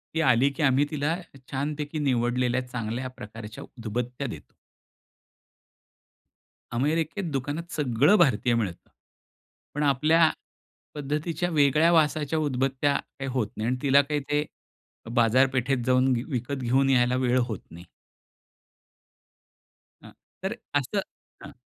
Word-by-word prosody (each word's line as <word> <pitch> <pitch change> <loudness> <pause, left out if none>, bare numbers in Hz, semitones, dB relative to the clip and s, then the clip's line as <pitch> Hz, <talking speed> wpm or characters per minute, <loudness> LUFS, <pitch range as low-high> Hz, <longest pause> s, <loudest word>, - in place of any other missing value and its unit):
ती 160 - +2
आली, 130 -2 +4
की 160 - 0
आम्ही 135 0 +4
तिला 150 +2 0 0.4
छानपैकी 150 +2 -3
निवडलेल्या 125 -2 +1
चांगल्या 125 +1 -4
प्रकारच्या 110 0 -9
उदबत्त्या 125 +3 -5
देतो. 115 - -10 2.2
अमेरिकेत 155 - -1
दुकानात 145 +5 -4
सगळं 145 - +3
भारतीय 125 - +3
मिळतं. 100 -7 -3 0.9
पण 150 - 0
आपल्या 155 +4 +4 0.7
पद्धतीच्या 150 +4 -2
वेगळ्या 155 +1 +4
वासाच्या 155 -1 +2
उदबत्त्या 135 0 0
काही 135 -1 -5
होत 125 -5 0
नाही. 110 - -2
आणि 130 - 0
तिला 140 0 +5
काही 145 +1 -2
ते 145 0 +1 0.7
बाजारपेठेत 130 +3 +3
जाऊन 130 0 +3
वि 120 - -2
विकत 125 0 -2
घेऊन 135 +3 +2
यायला 125 -1 +3
वेळ 130 -1 +2
होत 110 -6 -4
नाही. 85 +1 -11 2.2
हां. - - -13 0.3
तर 195 +4 -2 0.2
असं 145 +10 -2 0.4
हां. 145 - -10
135 Hz, 115 wpm, -26 LUFS, 125-150 Hz, 2.2 s, तिला